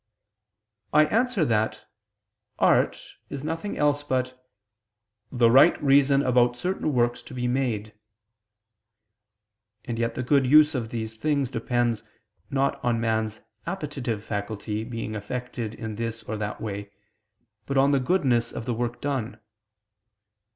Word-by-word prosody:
I 150 Hz, +1 st, +6 dB
answer 225 Hz, 0 st, +1 dB
that, 110 Hz, -3 st, 0 dB, 0.7 s
Art -, -, +3 dB, 0.3 s
is 140 Hz, -1 st, -6 dB
nothing 165 Hz, +6 st, -3 dB
else 145 Hz, 0 st, +2 dB
but 130 Hz, -2 st, -2 dB, 0.9 s
"the 120 Hz, -3 st, +4 dB
right 135 Hz, +4 st, +6 dB
reason 140 Hz, 0 st, +4 dB
about 120 Hz, -1 st, +3 dB
certain 180 Hz, 0 st, -1 dB
works 120 Hz, -2 st, +1 dB
to -, -, -11 dB
be 125 Hz, -1 st, -1 dB
made." 120 Hz, -5 st, -1 dB, 1.9 s
And 115 Hz, -2 st, -4 dB
yet 115 Hz, 0 st, -1 dB
the 125 Hz, -, -2 dB
good 135 Hz, +1 st, +3 dB, 0.3 s
of 120 Hz, -5 st, -3 dB
these 110 Hz, -1 st, -5 dB
things 140 Hz, -1 st, 0 dB
depends, 120 Hz, -2 st, 0 dB, 0.5 s
not 140 Hz, -1 st, 0 dB
on 120 Hz, -2 st, +1 dB
man's 110 Hz, -1 st, -1 dB, 0.3 s
appetitive 140 Hz, -, -3 dB
faculty 105 Hz, +1 st, -4 dB
being 115 Hz, -2 st, -5 dB
affected 115 Hz, +1 st, -5 dB
in 110 Hz, -2 st, -6 dB
this 115 Hz, 0 st, -4 dB
or 110 Hz, -, -4 dB
that 105 Hz, -1 st, -4 dB
way, 100 Hz, -2 st, -5 dB, 0.8 s
but 140 Hz, -, -1 dB
on 135 Hz, +1 st, +5 dB
the 140 Hz, -, +3 dB
goodness 130 Hz, -5 st, +1 dB
of 115 Hz, -, -6 dB
the 125 Hz, -, -1 dB
work 120 Hz, +1 st, -3 dB
done. 125 Hz, -6 st, -3 dB
120 Hz, 130 wpm, -26 LUFS, 110-140 Hz, 1.9 s, I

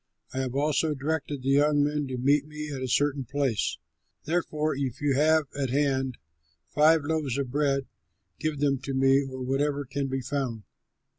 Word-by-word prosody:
I 130 Hz, -, -2 dB
have 130 Hz, -1 st, -2 dB
also 150 Hz, +2 st, +1 dB
directed 145 Hz, -1 st, -3 dB
the 135 Hz, -, -1 dB
young 145 Hz, +1 st, +4 dB
men 145 Hz, -1 st, -1 dB
to 130 Hz, -1 st, -4 dB
meet 140 Hz, +3 st, +2 dB
me 150 Hz, 0 st, -6 dB
at 135 Hz, -, -5 dB
a 130 Hz, -, -2 dB
certain 140 Hz, +2 st, +1 dB
place. 135 Hz, -3 st, -1 dB, 0.5 s
Therefore, 155 Hz, -2 st, 0 dB
if 135 Hz, -3 st, -3 dB
you 145 Hz, -1 st, +1 dB
have 155 Hz, +3 st, +4 dB
at 140 Hz, -2 st, -1 dB
hand 135 Hz, -2 st, 0 dB, 0.5 s
five 155 Hz, +1 st, +4 dB
loaves 145 Hz, -4 st, -1 dB
of 135 Hz, -3 st, -2 dB
bread, 140 Hz, -1 st, +1 dB, 0.5 s
give 155 Hz, -2 st, -2 dB
them 140 Hz, -2 st, +2 dB
to 135 Hz, +1 st, -4 dB
me 135 Hz, +1 st, +4 dB
or 130 Hz, -1 st, -6 dB
whatever 140 Hz, +2 st, 0 dB
can 135 Hz, +2 st, -3 dB
be 135 Hz, 0 st, -2 dB
found." 130 Hz, -5 st, -3 dB
140 Hz, 175 wpm, -27 LUFS, 135-150 Hz, 0.5 s, young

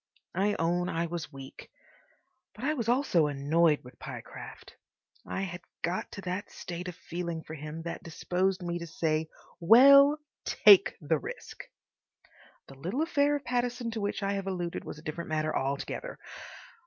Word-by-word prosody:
I 200 Hz, +3 st, +1 dB
own 175 Hz, +2 st, +1 dB
I 165 Hz, +1 st, -1 dB
was 170 Hz, -3 st, -5 dB
weak. 135 Hz, -1 st, -11 dB, 0.9 s
But 210 Hz, -, -10 dB
I 300 Hz, +3 st, +2 dB
was 235 Hz, -6 st, -2 dB
also 240 Hz, -, +3 dB
annoyed 150 Hz, +2 st, +2 dB
with 125 Hz, -, -14 dB
Pyecraft. -, -, -9 dB, 0.5 s
I -, -, -3 dB
had 175 Hz, -2 st, -5 dB, 0.2 s
got 175 Hz, +2 st, -2 dB
to 200 Hz, -, -6 dB
that 185 Hz, +2 st, -4 dB
state 180 Hz, +1 st, -7 dB
of 180 Hz, -, -6 dB
feeling 170 Hz, -1 st, -5 dB
for 155 Hz, -, -9 dB
him 155 Hz, +1 st, -7 dB
that 170 Hz, -, -5 dB
disposed 185 Hz, +3 st, -1 dB
me 175 Hz, 0 st, -2 dB
to 170 Hz, -, -6 dB
say, 160 Hz, -1 st, -1 dB, 0.3 s
"Well, 275 Hz, -, +8 dB, 0.3 s
TAKE 205 Hz, -3 st, +6 dB
the 155 Hz, 0 st, +1 dB
risk!" -, -, -8 dB, 1.0 s
The 135 Hz, -1 st, -14 dB
little 195 Hz, -, -1 dB
affair 290 Hz, -3 st, +2 dB
of 285 Hz, -2 st, -5 dB
Pattison 245 Hz, -1 st, -1 dB
to 225 Hz, -1 st, -4 dB
which 205 Hz, 0 st, -2 dB
I 200 Hz, 0 st, 0 dB
have 195 Hz, -1 st, -3 dB
alluded 175 Hz, -3 st, -3 dB
was -, -, -7 dB
a 150 Hz, -, -13 dB
different 160 Hz, +2 st, -5 dB
matter 155 Hz, 0 st, 0 dB
altogether. 140 Hz, -, -3 dB
175 Hz, 165 wpm, -29 LUFS, 160-210 Hz, 1.0 s, Well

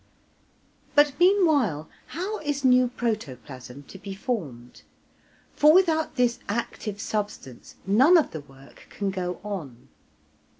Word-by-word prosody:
But 290 Hz, -1 st, +5 dB
meanwhile, 310 Hz, -, +3 dB, 0.2 s
how 385 Hz, +6 st, -4 dB
is 290 Hz, -2 st, -3 dB
new 250 Hz, 0 st, +5 dB
protoplasm 140 Hz, -, -5 dB
to 190 Hz, -, -13 dB
be 195 Hz, 0 st, -7 dB
formed? 150 Hz, -, -5 dB, 0.7 s
for 300 Hz, +1 st, +6 dB
without 325 Hz, -4 st, +2 dB
this 245 Hz, -3 st, +1 dB
active 210 Hz, -1 st, -4 dB
substance 205 Hz, -, -5 dB
none 260 Hz, -, +6 dB
of 320 Hz, -, +1 dB
the 155 Hz, -, -6 dB
work 135 Hz, 0 st, -18 dB
can 200 Hz, -1 st, -3 dB
go 180 Hz, -2 st, -4 dB
on. 155 Hz, -, -7 dB
210 Hz, 120 wpm, -25 LUFS, -, 0.7 s, for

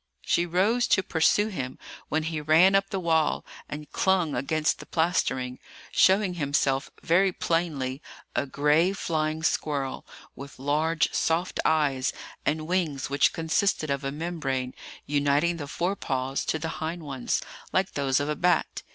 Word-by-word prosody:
She 175 Hz, -, +2 dB
rose 205 Hz, +8 st, +2 dB
to 190 Hz, -, +3 dB
pursue 185 Hz, +6 st, +2 dB
him, 130 Hz, -10 st, -5 dB, 0.3 s
when 155 Hz, +1 st, 0 dB
he 160 Hz, -1 st, -3 dB
ran 160 Hz, +6 st, +5 dB
up 195 Hz, 0 st, +2 dB
the 195 Hz, -, -2 dB
wall, 160 Hz, -3 st, +1 dB, 0.2 s
and 150 Hz, 0 st, -6 dB
clung 185 Hz, -5 st, +2 dB
against 155 Hz, +4 st, 0 dB
the -, -, -10 dB
plastering, 145 Hz, -7 st, 0 dB, 0.3 s
showing 190 Hz, 0 st, +4 dB
himself 140 Hz, -4 st, 0 dB
very 190 Hz, +3 st, +3 dB
plainly 155 Hz, -7 st, -1 dB, 0.3 s
a 140 Hz, -, 0 dB
gray 150 Hz, +7 st, +2 dB
flying 155 Hz, -4 st, -2 dB
squirrel, 140 Hz, -4 st, -1 dB, 0.3 s
with 140 Hz, +1 st, -10 dB
large, 155 Hz, +4 st, +1 dB
soft 170 Hz, +3 st, 0 dB
eyes, 145 Hz, -5 st, +2 dB, 0.3 s
and 155 Hz, 0 st, 0 dB
wings 155 Hz, -6 st, -1 dB
which 140 Hz, -, +4 dB
consisted 160 Hz, -1 st, 0 dB
of 140 Hz, 0 st, -1 dB
a 135 Hz, -, -2 dB
membrane 140 Hz, -5 st, -3 dB, 0.3 s
uniting 145 Hz, +4 st, +1 dB
the 145 Hz, -3 st, -6 dB
fore 175 Hz, +6 st, -1 dB
paws 130 Hz, -4 st, -2 dB
to -, -, 0 dB
the 160 Hz, +1 st, -4 dB
hind 165 Hz, +1 st, -3 dB
ones, 135 Hz, -4 st, -2 dB, 0.3 s
like 190 Hz, 0 st, +1 dB
those 135 Hz, -1 st, +1 dB
of 145 Hz, -, -1 dB
a 150 Hz, -, -1 dB
bat. 180 Hz, +3 st, +1 dB
155 Hz, 150 wpm, -27 LUFS, 140-175 Hz, 0.3 s, ran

